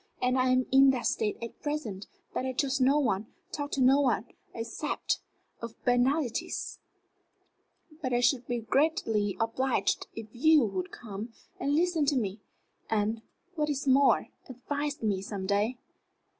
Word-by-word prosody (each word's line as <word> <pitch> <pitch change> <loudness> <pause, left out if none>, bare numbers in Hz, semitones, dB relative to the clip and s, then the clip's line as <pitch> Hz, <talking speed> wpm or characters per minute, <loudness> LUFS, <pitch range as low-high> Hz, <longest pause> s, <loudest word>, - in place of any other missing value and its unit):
And 250 0 +1
I 255 0 +3
am 255 0 +3
in 270 +1 +7
that 255 -2 0
state 215 -2 0
at 230 - -8
present 285 -10 -4 0.3
that - - -1
I 260 0 -2
trust 270 +1 0
no 270 +3 +5
one, 215 -7 0 0.2
talk 290 -1 -3
to 275 - 0
no 265 +2 +6
one, 250 -4 +1 0.3
except 230 +6 -2 0.4
of 230 -1 -6
banalités. 275 - 0 1.2
But 260 -4 -2
I 240 - +2
should 245 0 +2
be 240 -1 -1
greatly 225 - +1
obliged 250 +3 0
if 225 - -6
you 300 +2 +5
would 185 -3 -3
come 220 0 -8 0.3
and 285 +1 +1
listen 330 -3 +2
to 280 - +3
me, 210 -4 -1 0.5
and, 220 +1 0 0.3
what 300 -3 -1
is 285 -1 -2
more, 270 +1 +4 0.2
advise 285 +2 -4
me 200 -3 +1
some 195 -1 -5
day." 205 +5 +1
255 Hz, 155 wpm, -29 LUFS, 225-285 Hz, 1.2 s, in